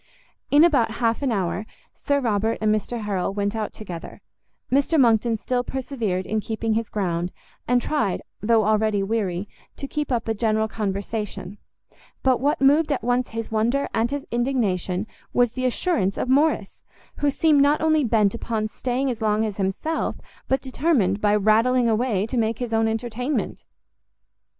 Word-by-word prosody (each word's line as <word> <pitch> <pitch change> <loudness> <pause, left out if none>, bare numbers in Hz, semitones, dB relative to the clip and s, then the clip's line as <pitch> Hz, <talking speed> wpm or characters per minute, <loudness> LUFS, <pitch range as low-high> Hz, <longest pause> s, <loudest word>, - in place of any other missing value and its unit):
In 290 +2 +6
about 270 -10 +3
half 230 +1 0
an 275 -3 0
hour, 195 0 -2 0.3
Sir 285 0 0
Robert 225 -3 0
and 215 0 +2
Mr 225 +2 -2
Harrel 195 -2 -2
went 200 +1 -1
out 215 -1 -2
together: 175 -6 -9 0.5
Mr 280 +4 +3
Monckton 230 -2 +3
still 245 +3 -1
persevered 235 -8 -3
in 220 - -1
keeping 220 +1 -2
his 225 0 -1
ground, 175 -3 -2 0.4
and 245 0 +3
tried, 245 -8 -1 0.2
though 220 0 +3
already 215 -1 +2
weary, 195 -3 -1 0.3
to 275 - -5
keep 295 0 -3
up 235 -2 -1
a 225 - +1
general 220 0 +1
conversation; 205 -1 -4 0.6
but 260 -2 +3
what 285 +3 +1
moved 295 +3 +4
at 270 - -1
once 245 +1 +1
his 225 0 -5
wonder 235 +6 +1
and 225 +1 +1
his 285 0 -4
indignation 215 -7 0 0.3
was 245 -2 +3
the 255 +1 -3
assurance 250 - 0
of - - -2
Morrice, 280 -6 +1 0.4
who 290 - +2
seemed 295 0 +3
not 290 +2 +4
only 315 -1 +3
bent 215 -4 +2
upon 225 -2 -2
staying 255 +4 -2
as 235 -2 -6
long 215 0 +2
as 210 -3 -4
himself, 200 +12 -1 0.3
but 265 - +1
determined, 255 - +1
by 210 0 +3
rattling 225 +4 +3
away, 220 -3 +1
to 245 +3 -4
make 225 -1 +1
his 240 -2 -4
own 225 0 +3
entertainment. 240 +5 -3
225 Hz, 165 wpm, -23 LUFS, 210-260 Hz, 0.6 s, In